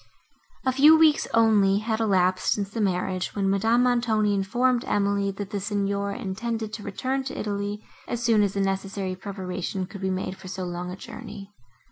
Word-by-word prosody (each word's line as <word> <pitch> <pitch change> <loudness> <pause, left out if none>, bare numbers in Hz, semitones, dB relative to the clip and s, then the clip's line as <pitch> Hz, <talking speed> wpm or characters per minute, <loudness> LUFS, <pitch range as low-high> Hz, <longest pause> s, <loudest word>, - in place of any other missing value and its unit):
A 260 - +3
few 295 +5 +7
weeks 315 -2 +4
only 210 -4 +4
had 220 +1 -1
elapsed, 185 -4 +2
since 200 -1 -3
the 225 - -3
marriage, 185 -1 -1
when 195 -1 +1
Madame 225 +5 +3
Montoni 230 -4 +2
informed 240 +6 +1
Emily, 200 -1 +1
that 195 0 -6
the 205 - -2
Signor 200 0 -1
intended 220 +3 -4
to 215 - -5
return 260 +7 -2
to 265 - -5
Italy, 205 0 -3 0.2
as 240 0 -3
soon 225 -3 +4
as 200 -2 +1
the 200 - +1
necessary 195 0 -2
preparation 185 -1 -4
could 200 +1 -10
be 190 - -1
made 185 0 -3
for 190 - -11
so 185 0 -5
long 175 0 -4
a 180 - -5
journey. 195 +1 -9
200 Hz, 180 wpm, -25 LUFS, 190-225 Hz, 0.2 s, few